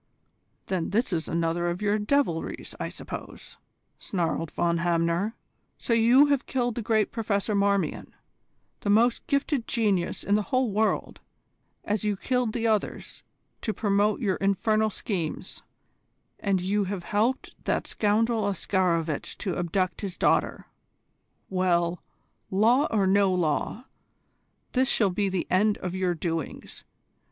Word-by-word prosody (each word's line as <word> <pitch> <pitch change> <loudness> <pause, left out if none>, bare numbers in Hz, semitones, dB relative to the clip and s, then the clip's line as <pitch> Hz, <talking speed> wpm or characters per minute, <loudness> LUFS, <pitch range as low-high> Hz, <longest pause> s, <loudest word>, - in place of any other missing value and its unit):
"Then 180 -4 -2
this 215 0 0
is 160 -2 -1
another 170 +1 0
of 175 +1 -3
your 210 0 +1
devilries, 210 - -1
I - - -3
suppose," - - -9 0.4
snarled 165 -3 -2
Von 170 +1 0
Hamner. 170 +5 0 0.4
"So 235 - -1
you 235 +5 +6
have 285 -2 0
killed 245 -2 0
the 235 - -3
great 220 -1 +1
Professor 210 -2 -1
Marmion, 200 -1 0 0.6
the 205 - -3
most 230 +4 +3
gifted 280 -3 0
genius 200 -7 0
in 200 - 0
the 210 - +4
whole 255 -3 +1
world, 215 +2 0 0.6
as 210 +1 -1
you 210 -2 0
killed 250 +1 0
the 230 -1 -2
others, 215 -3 -1 0.4
to 215 - -2
promote 205 +2 +1
your 195 -5 +1
infernal 215 +2 +1
schemes; 185 -6 -3 0.8
and 195 -3 0
you 200 +2 0
have 190 -2 -4
helped 220 +8 0
that - - 0
scoundrel 220 +1 +1
Oscarovitch 175 -5 0
to 185 -4 -3
abduct 180 +2 -1
his 195 -3 -4
daughter. - - +1 0.8
Well, 175 -2 +1 0.5
law 235 +9 +3
or 205 -3 +2
no 195 0 +4
law, 180 - -1 0.9
this 260 0 +2
shall 205 -4 +3
be 200 +2 0
the 185 -2 -1
end 205 +3 +3
of 180 -1 -5
your 185 -2 0
doings. 165 -1 -5
200 Hz, 135 wpm, -26 LUFS, 180-225 Hz, 0.9 s, you